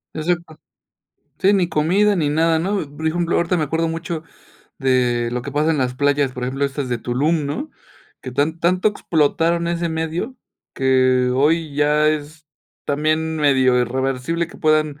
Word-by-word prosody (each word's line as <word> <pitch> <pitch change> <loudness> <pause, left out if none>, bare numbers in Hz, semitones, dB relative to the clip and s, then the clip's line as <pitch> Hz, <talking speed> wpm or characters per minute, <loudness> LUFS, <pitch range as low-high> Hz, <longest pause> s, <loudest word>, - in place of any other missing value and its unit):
Se 155 - -3
sepa, 170 -2 -2 0.8
sí, 195 +2 +4
ni 190 -3 +2
comida 180 +7 +2
ni 160 -6 0
nada, 160 +2 +2
¿no? 195 +5 -1 0.2
Por 160 +2 -5
ejemplo, 170 +1 0
ahorita 170 +1 +1
me 160 - 0
acuerdo 165 +3 -1
mucho 165 0 -4 0.6
de 125 -3 +1
lo 125 - -2
que 140 - -6
pasa 150 +3 +1
en 155 - 0
las 125 -1 0
playas, 145 0 +1
por 125 - -7
ejemplo, 135 +3 -2
estas 140 -1 -4
de 120 - -1
Tulum, 145 +7 0
¿no?, 155 - -4 0.5
que 130 - -7
tan 155 +5 -1
tanto 180 +4 +2
explotaron 170 -2 0
ese 170 0 -1
medio, 160 +10 -3 0.4
que 130 -1 +2
hoy 155 +2 +1
ya 150 +1 +2
es 155 +1 -4 0.4
también, 155 +2 0
medio 130 -4 +3
irreversible 130 +6 -1
que - - -14
puedan 155 -2 +1
155 Hz, 170 wpm, -20 LUFS, 135-165 Hz, 0.8 s, sí